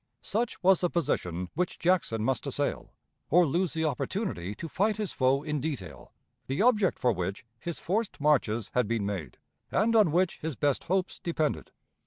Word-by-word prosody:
Such 230 -2 -2
was 190 0 +5
the 175 - +2
position 90 - -1
which 180 +3 -1
Jackson 170 -11 +1
must 130 0 0
assail, - - -2 0.4
or 175 +3 +6
lose 170 +4 0
the 160 -1 0
opportunity 140 - -2
to 165 - -6
fight 210 +6 +1
his 210 -3 -2
foe 135 +2 +2
in 150 -2 -2
detail 95 - -5 0.4
the 135 - -2
object 215 -4 +3
for 125 - +2
which 95 +1 -3
his 170 -1 -4
forced 215 +5 -2
marches 120 -8 +2
had 125 -4 +2
been 115 -2 0
made, 90 -11 -4 0.3
and 230 +3 +2
on 210 -8 +5
which 180 +2 +1
his 160 -2 -4
best 145 -2 0
hopes 185 +2 -1
depended. 160 -3 -1
155 Hz, 175 wpm, -29 LUFS, 115-185 Hz, 0.4 s, or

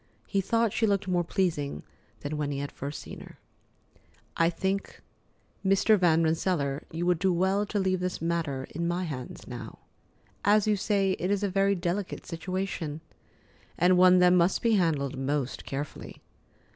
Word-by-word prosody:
He 195 - 0
thought 230 +2 +1
she 225 - +2
looked 200 -1 0
more 175 -1 +1
pleasing 160 - -1 0.4
than 145 +1 -4
when 150 -1 -2
he 140 - -3
had 140 0 -4
first 140 +2 -6
seen - - -9
her. - - -13 1.0
"I 165 0 +3
think, 190 +3 -3 0.6
Mr. 195 +3 +4
Van 170 -4 +3
Rensselaer, 160 -3 0
you 165 +2 -3
would 180 -2 +2
do 190 +1 +2
well 190 +4 +1
to 210 - -2
leave 190 -2 +1
this 180 0 -2
matter 160 -5 -2
in 170 +2 -2
my 175 +2 -1
hands 135 -7 -6
now. 120 -3 -8 0.7
As 210 +1 +4
you 215 -1 +3
say, 200 -1 +1
it 180 - -1
is 205 0 0
a 200 - +1
very 195 +1 +2
delicate 180 +2 -3
situation, 165 -3 -4 0.8
and 180 +2 +4
one 185 0 +7
that 180 0 +6
must 180 +1 +3
be 230 - +3
handled 150 -8 +1
most 135 -1 -2
carefully. 140 +2 -6
180 Hz, 170 wpm, -28 LUFS, 150-195 Hz, 1.0 s, one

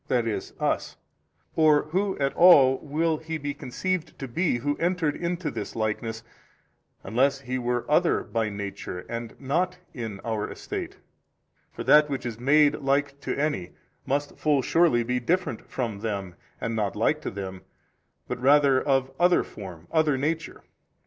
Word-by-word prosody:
e., 115 -3 +1 0.2
us? - - -1 0.6
or 155 -2 +5
who 190 +4 0
at 140 0 0
all 135 -7 +7
will 155 +2 0
He 160 +1 -5
be 145 -1 -4
conceived 170 +6 -3
to 135 - -5
be 145 +2 0
who 145 +4 -1
entered 170 -3 0
into 170 -1 -2
this - - -6
likeness, 110 +1 -2 0.8
unless 135 +7 +1
He 130 -1 -3
were 120 0 -1
other - - +3
by 110 -1 -1
Nature 100 -3 -6
and 115 -1 -6
not 175 +7 0 0.2
in 110 -5 -5
our 110 -2 -2
estate? - - -6 0.7
for 115 - -6
that 150 +4 +6
which 135 -3 -3
is 115 -2 -4
made 145 +3 +4
like 140 0 0
to - - -3
any, 145 - -1 0.3
must 145 +2 -2
full 145 -3 +2
surely 165 -8 +3
be 125 +2 -1
different 165 -2 -1
from 115 -6 -3
them 100 -4 -3 0.3
and 115 - -2
not 105 -3 -1
like 135 +8 +1
to - - -3
them 95 -1 -6 0.7
but - - -4
rather 140 -1 +5
of 135 -2 +1
other 175 0 +4
form, 90 -5 -10
other 155 -4 +3
nature. 155 +3 -3
135 Hz, 155 wpm, -26 LUFS, 115-155 Hz, 0.8 s, all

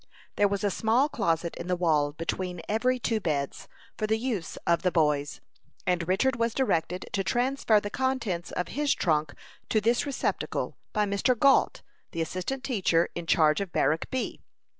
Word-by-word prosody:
There 205 - +4
was 200 +1 -2
a 205 - +2
small 235 +9 +2
closet 170 - -1
in 170 - -6
the 180 - +1
wall 155 -5 +2
between 170 +2 -4
every 250 +4 +1
two 230 -2 0
beds, 145 -7 -2 0.3
for 215 - 0
the 220 +1 +2
use 220 -8 -3
of 170 0 +2
the 180 - +1
boys, 150 -3 +1 0.4
and 175 -2 0
Richard 235 +7 +2
was 230 -1 0
directed 180 -8 0
to 195 - 0
transfer 245 -1 +2
the 205 0 -6
contents 235 -10 -1
of 180 - -3
his 290 0 +1
trunk 155 -3 0 0.3
to 220 - +3
this 235 +6 +1
receptacle, 280 - -2 0.2
by 210 -1 +1
Mr. 200 +5 +1
Gault, 275 +3 +3 0.3
the 165 - -2
assistant 185 +11 -4
teacher 190 -10 +1
in 170 -1 -6
charge 155 -1 +4
of 195 -3 -4
Barrack 160 +1 +1
B. 260 -2 -3
195 Hz, 175 wpm, -28 LUFS, 170-235 Hz, 0.4 s, There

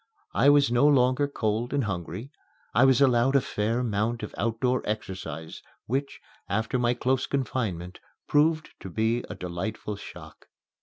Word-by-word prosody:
I 140 - +5
was 145 -3 +5
no 120 +4 +4
longer 130 0 +3
cold 115 -2 -2
and 140 - +1
hungry. 95 - -5 0.4
I 130 - +5
was 130 0 +4
allowed 130 0 +4
a - - +7
fair 110 -2 -1
amount 115 0 -1
of - - -6
outdoor 115 +3 0
exercise 90 -7 -5 0.2
which, 135 +4 -2 0.3
after 110 +5 0
my 120 0 +2
close 130 +2 0
confinement, 110 -10 -2 0.3
proved 155 +2 +2
to 95 - -8
be 110 +5 0
a 105 - -5
delightful 95 +4 -4
shock. - - -12
120 Hz, 150 wpm, -27 LUFS, 105-130 Hz, 0.4 s, a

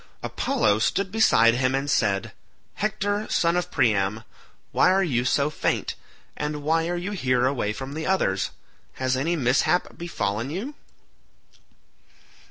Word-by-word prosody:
Apollo 105 +1 +1
stood 190 - 0
beside 115 - +5
him 130 +2 +1
and 135 +1 -2
said, 100 -8 +1 0.4
"Hector 205 0 -1
son 170 0 +2
of 180 0 -1
Priam, 105 - +1 0.5
why - - +4
are 190 +1 +3
you 125 -9 0
so 140 +3 +1
faint, - - -1 0.4
and 150 0 -4
why 165 +2 +1
are 175 - -1
you 180 +4 -4
here 125 -10 +1
away 130 -6 0
from 135 +5 -6
the 160 +1 -4
others? 100 - +1 0.4
Has 130 0 -1
any 155 +7 0
mishap 140 +5 +1
befallen 115 -8 -2
you?" 205 - -4
140 Hz, 140 wpm, -24 LUFS, 120-180 Hz, 0.5 s, beside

